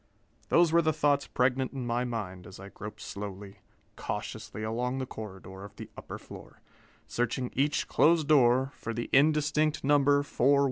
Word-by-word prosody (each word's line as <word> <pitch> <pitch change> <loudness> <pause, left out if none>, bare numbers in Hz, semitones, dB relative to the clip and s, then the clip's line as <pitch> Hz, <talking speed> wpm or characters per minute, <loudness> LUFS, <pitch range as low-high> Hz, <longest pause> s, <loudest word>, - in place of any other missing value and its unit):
Those 170 -1 +4
were 170 +1 +5
the 160 -1 +2
thoughts 145 -1 +1
pregnant 130 +1 0
in 130 -3 -4
my 120 +1 0
mind 95 -7 -5
as 95 - -12
I 100 +1 -9
groped 105 +1 -9
slowly, 100 -1 -7 0.4
cautiously 110 - -5
along 120 +4 -2
the 130 - -2
corridor 95 -4 -9
of 100 - -11
the - - -10
upper - - -8
floor, - - -13 0.5
searching 120 +1 -2
each 140 +3 +1
closed 160 -2 +3
door 130 -2 +4
for 115 -2 -6
the 120 - -4
indistinct 150 +1 +3
number 145 0 +4
4167. 140 0 +3
125 Hz, 160 wpm, -29 LUFS, 110-145 Hz, 0.5 s, were